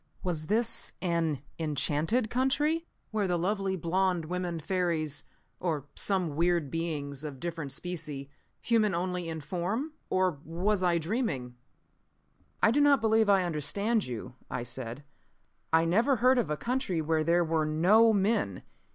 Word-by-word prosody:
Was 160 Hz, -5 st, -2 dB
this 230 Hz, +2 st, 0 dB
an 165 Hz, -6 st, 0 dB, 0.2 s
enchanted 160 Hz, -, 0 dB
country? 295 Hz, +6 st, +1 dB, 0.2 s
Where 210 Hz, -3 st, 0 dB
the 175 Hz, -1 st, +1 dB
lovely 195 Hz, +2 st, 0 dB
blonde 180 Hz, 0 st, 0 dB
women 175 Hz, 0 st, -3 dB
fairies 165 Hz, -3 st, -1 dB, 0.3 s
or 155 Hz, -6 st, -2 dB
some 185 Hz, -7 st, 0 dB
weird 170 Hz, -3 st, +1 dB
beings 150 Hz, -4 st, -3 dB
of 145 Hz, -4 st, -6 dB
different 165 Hz, -4 st, -4 dB
specie, 150 Hz, -3 st, -4 dB, 0.3 s
human 215 Hz, -5 st, +2 dB
only 180 Hz, -1 st, -2 dB
in 160 Hz, -1 st, -4 dB
form? 200 Hz, -, -2 dB, 0.2 s
Or 185 Hz, -5 st, +1 dB
was 185 Hz, +5 st, 0 dB
I 175 Hz, -2 st, +3 dB
dreaming? 160 Hz, -, -2 dB, 1.1 s
"I 220 Hz, -, +6 dB
do 290 Hz, +5 st, +3 dB
not 285 Hz, -1 st, +5 dB
believe 220 Hz, -1 st, +3 dB
I 195 Hz, -2 st, +5 dB
understand 200 Hz, -, 0 dB
you," 120 Hz, 0 st, -6 dB, 0.2 s
I 120 Hz, -, -3 dB
said. 125 Hz, +2 st, -5 dB, 0.7 s
"I 165 Hz, +1 st, +4 dB
never 225 Hz, +11 st, +3 dB
heard 255 Hz, +2 st, +4 dB
of 230 Hz, -, -1 dB
a 150 Hz, -, -1 dB
country 235 Hz, -, -1 dB
where 160 Hz, 0 st, +1 dB
there 170 Hz, +2 st, +3 dB
were 160 Hz, -1 st, +1 dB
no 195 Hz, +9 st, +5 dB
men. 200 Hz, -, +1 dB
175 Hz, 145 wpm, -29 LUFS, 155-210 Hz, 1.1 s, I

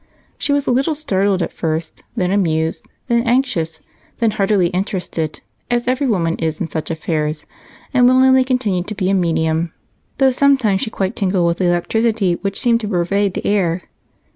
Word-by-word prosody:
She -, -, -1 dB
was 285 Hz, -1 st, +1 dB
a -, -, +1 dB
little 270 Hz, +5 st, +1 dB
startled 200 Hz, -, 0 dB
at -, -, -5 dB
first, 160 Hz, 0 st, -3 dB
then 180 Hz, -1 st, 0 dB
amused, 160 Hz, -5 st, 0 dB, 0.2 s
then 235 Hz, -1 st, +2 dB
anxious, 235 Hz, -, 0 dB, 0.4 s
then 230 Hz, -2 st, +2 dB
heartily 195 Hz, -3 st, +2 dB
interested, 180 Hz, -4 st, -3 dB, 0.3 s
as 240 Hz, 0 st, 0 dB
every 260 Hz, +2 st, +1 dB
woman 170 Hz, -7 st, 0 dB
is 160 Hz, -1 st, -2 dB
in 170 Hz, -, -3 dB
such 155 Hz, +1 st, -4 dB
affairs, 155 Hz, -2 st, -2 dB, 0.5 s
and 250 Hz, -2 st, +5 dB
willingly 260 Hz, +1 st, +5 dB
continued 220 Hz, -9 st, -1 dB
to 215 Hz, -, -4 dB
be 190 Hz, -1 st, 0 dB
a -, -, +2 dB
medium, 165 Hz, -2 st, 0 dB, 0.5 s
though 270 Hz, -1 st, +4 dB
sometimes 255 Hz, -7 st, +3 dB
she -, -, -2 dB
quite 195 Hz, -3 st, -2 dB
tingled 185 Hz, -3 st, +1 dB
with 170 Hz, 0 st, 0 dB
the 185 Hz, -, +1 dB
electricity 195 Hz, +3 st, +1 dB
which 195 Hz, 0 st, -2 dB
seemed 235 Hz, -1 st, +2 dB
to 215 Hz, -, -3 dB
pervade 195 Hz, +1 st, 0 dB
the -, -, -4 dB
air. 185 Hz, -4 st, +1 dB
195 Hz, 175 wpm, -18 LUFS, 170-235 Hz, 0.5 s, and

